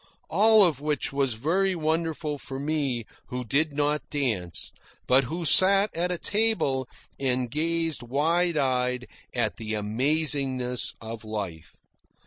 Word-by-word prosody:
All 215 Hz, +3 st, +6 dB
of 150 Hz, -6 st, 0 dB
which 150 Hz, -2 st, -1 dB
was 135 Hz, -4 st, 0 dB
very 185 Hz, -, +1 dB
wonderful 160 Hz, -2 st, -1 dB
for 135 Hz, 0 st, -6 dB
me, 140 Hz, -5 st, -1 dB, 0.2 s
who 125 Hz, 0 st, -5 dB
did 150 Hz, +7 st, +1 dB
not 150 Hz, +1 st, -1 dB
dance, 110 Hz, -, -2 dB, 0.3 s
but 130 Hz, +1 st, +4 dB
who 165 Hz, +6 st, -4 dB
sat 195 Hz, +5 st, +5 dB
at 175 Hz, +2 st, 0 dB
a 180 Hz, -, -1 dB
table 170 Hz, -, +1 dB, 0.3 s
and 125 Hz, -3 st, 0 dB
gazed 165 Hz, +1 st, 0 dB
wide 160 Hz, +7 st, +1 dB
eyed 125 Hz, -2 st, 0 dB, 0.3 s
at -, -, 0 dB
the 110 Hz, -1 st, -4 dB
amazingness 130 Hz, +3 st, 0 dB
of 115 Hz, 0 st, -7 dB
life. 100 Hz, -7 st, -6 dB
145 Hz, 130 wpm, -26 LUFS, 125-165 Hz, 0.3 s, All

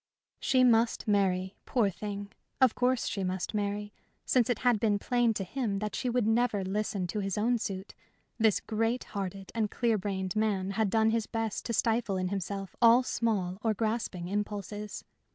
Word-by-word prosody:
She 255 Hz, -1 st, +3 dB
must 230 Hz, -2 st, +3 dB
marry, 190 Hz, -2 st, +1 dB
poor 220 Hz, -6 st, +2 dB
thing! 205 Hz, +2 st, -6 dB, 0.3 s
Of 260 Hz, -4 st, +5 dB
course 250 Hz, 0 st, +1 dB
she 195 Hz, -, -2 dB
must 185 Hz, +2 st, -2 dB
marry. 205 Hz, 0 st, -2 dB, 0.3 s
Since 250 Hz, -2 st, +3 dB
it 245 Hz, -, +2 dB
had 240 Hz, -3 st, +4 dB
been 210 Hz, -1 st, +2 dB
plain 240 Hz, +2 st, +2 dB
to 195 Hz, -, -1 dB
him 215 Hz, 0 st, -2 dB
that 210 Hz, +1 st, -3 dB
she 250 Hz, -, -1 dB
would 245 Hz, -2 st, +1 dB
never 225 Hz, -2 st, +2 dB
listen 195 Hz, 0 st, -1 dB
to 180 Hz, +4 st, -3 dB
his 195 Hz, -1 st, -2 dB
own 235 Hz, +3 st, +2 dB
suit, 195 Hz, -1 st, -5 dB, 0.5 s
this 220 Hz, -2 st, +3 dB
great 225 Hz, +3 st, -1 dB
hearted 195 Hz, -1 st, -5 dB
and 220 Hz, -2 st, 0 dB
clear 230 Hz, -1 st, +1 dB
brained 190 Hz, -1 st, -3 dB
man 200 Hz, -3 st, 0 dB
had 215 Hz, 0 st, +1 dB
done 220 Hz, +2 st, +3 dB
his 225 Hz, -1 st, 0 dB
best 225 Hz, -2 st, -3 dB
to 230 Hz, -, -2 dB
stifle 220 Hz, -3 st, +1 dB
in 185 Hz, 0 st, -1 dB
himself 195 Hz, 0 st, -4 dB
all 235 Hz, +2 st, +7 dB
small 200 Hz, -7 st, -1 dB
or 220 Hz, -1 st, +1 dB
grasping 215 Hz, -5 st, -2 dB
impulses. 205 Hz, +1 st, -4 dB
210 Hz, 180 wpm, -30 LUFS, 195-230 Hz, 0.5 s, all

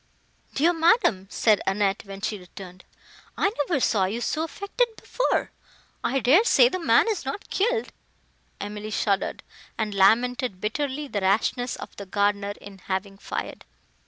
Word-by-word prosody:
"Dear 330 Hz, +5 st, +3 dB
madam," 325 Hz, -, +3 dB
said 215 Hz, -1 st, +3 dB
Annette, 195 Hz, +1 st, 0 dB
when 195 Hz, 0 st, -9 dB
she 210 Hz, 0 st, -2 dB
returned, 180 Hz, 0 st, -12 dB, 0.5 s
"I 405 Hz, -, +2 dB
never 290 Hz, +1 st, +1 dB
saw 205 Hz, -6 st, +2 dB
you 210 Hz, +5 st, -2 dB
so 305 Hz, +5 st, -1 dB
affected 400 Hz, +8 st, -1 dB
before! -, -, -1 dB, 0.5 s
I 270 Hz, +2 st, +1 dB
dare 270 Hz, -, +5 dB
say 485 Hz, -, +6 dB
the 370 Hz, -, -3 dB
man 340 Hz, -, +4 dB
is 430 Hz, -5 st, -1 dB
not 275 Hz, +10 st, -6 dB
killed." 455 Hz, +3 st, 0 dB, 0.7 s
Emily 210 Hz, +1 st, -6 dB
shuddered, 200 Hz, -2 st, -1 dB, 0.3 s
and 215 Hz, -2 st, -2 dB
lamented 225 Hz, +2 st, +2 dB
bitterly 280 Hz, +7 st, -2 dB
the 205 Hz, -6 st, -3 dB
rashness 225 Hz, +5 st, +1 dB
of -, -, -10 dB
the 200 Hz, -, -8 dB
gardener 200 Hz, +1 st, 0 dB
in 200 Hz, -1 st, -12 dB
having 195 Hz, +1 st, -4 dB
fired. -, -, -5 dB
215 Hz, 150 wpm, -25 LUFS, 200-300 Hz, 0.7 s, say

